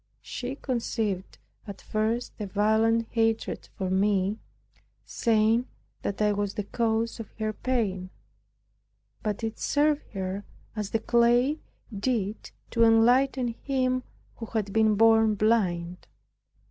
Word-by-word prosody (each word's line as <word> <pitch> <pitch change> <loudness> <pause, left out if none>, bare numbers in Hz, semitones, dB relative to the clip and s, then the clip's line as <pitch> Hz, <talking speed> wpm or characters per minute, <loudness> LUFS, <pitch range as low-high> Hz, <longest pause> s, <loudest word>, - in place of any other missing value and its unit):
She 255 +2 -5
conceived 225 -7 -2 0.3
at 200 -2 -7
first 220 +3 -1
a 210 - -3
violent 220 +3 +2
hatred 225 -1 0
for 190 -3 -2
me, 195 +1 +1 0.7
saying 225 +2 +2 0.3
that 200 - -3
I 210 - +3
was 205 -1 -2
the 210 - -2
cause 225 +2 -1
of 225 - -7
her 215 -1 -2
pain. 205 -7 -1 1.1
But 210 +1 -3
it 225 0 -3
served 295 0 +1
her, 190 0 -3 0.3
as 210 -2 -3
the 225 - +1
clay 240 +6 +3 0.4
did 210 -1 -2 0.2
to 230 - +3
enlighten 245 +3 +4
him 255 +1 -1 0.4
who 225 - -6
had 210 -3 -2
been 220 -1 +4
born 225 0 +5
blind. 180 -5 0
220 Hz, 120 wpm, -27 LUFS, 205-235 Hz, 1.1 s, born